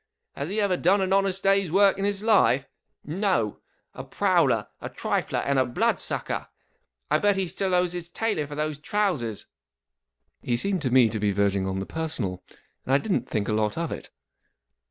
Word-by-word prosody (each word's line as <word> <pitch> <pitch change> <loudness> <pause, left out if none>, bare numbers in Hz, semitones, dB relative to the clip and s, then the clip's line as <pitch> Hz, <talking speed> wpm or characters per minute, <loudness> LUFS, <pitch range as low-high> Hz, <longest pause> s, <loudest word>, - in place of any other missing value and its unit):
Has 140 +3 -4
he 210 +3 -1
ever 200 -3 +1
done 190 +5 +3
an 190 0 +1
honest 195 -1 +1
day's 195 -3 +3
work 195 +1 +4
in 195 - 0
his 205 0 -1
life? 140 - +3 0.4
No! 165 - 0 0.3
A - - -7
prowler, - - +2
a - - -5
trifler, - - -2
and 140 -1 +2
a - - +5
blood 120 - +1
sucker! - - -2
And - - -3 0.7
I 150 - +4
bet 205 +1 +3
he 190 -1 0
still 190 +1 -1
owes 180 -1 +1
his 175 -1 -6
tailor 190 -6 -1
for 145 - -7
those 150 -1 -2
trousers! 155 - -1 0.5
" - - -53
He 120 - -1
seemed 190 +6 0
to 135 - -1
me 125 -1 +5
to 110 0 -3
be 105 -1 +1
verging 100 -1 +1
on 95 0 -2
the 95 - -3
personal, 125 - -4 0.4
and 135 - +2
I - - +7
didn't 145 - -2
think 105 -3 -1
a - - 0
lot 105 +2 0
of 165 -1 -2
it. - - -7
160 Hz, 200 wpm, -25 LUFS, 120-195 Hz, 0.7 s, I